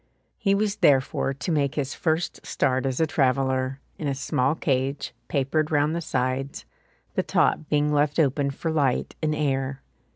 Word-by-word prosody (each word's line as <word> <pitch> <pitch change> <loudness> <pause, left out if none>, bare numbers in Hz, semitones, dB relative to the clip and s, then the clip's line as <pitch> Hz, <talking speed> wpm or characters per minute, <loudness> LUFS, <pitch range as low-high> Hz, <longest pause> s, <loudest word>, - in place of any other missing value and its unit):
He 195 -2 +2
was 205 0 0
therefore 135 -7 +3
to 140 +6 -4
make 145 -3 +1
his 135 -2 -2
first 160 +1 -1
start 130 0 0
as 130 -1 -2
a 160 - +4
traveller, 130 -2 +1 0.2
in 150 - -2
a 140 - 0
small 140 0 0
cage, 135 -1 -1
papered 150 +2 0
round 150 +1 +2
the 170 - -2
sides, 130 -1 -2 0.5
the - - +1
top 150 - +1
being 150 0 +2
left 145 0 +2
open 140 -2 +2
for 160 +4 -3
light 140 -5 0
and 155 -1 +1
air. 135 -2 -1
140 Hz, 165 wpm, -25 LUFS, 135-155 Hz, 0.5 s, a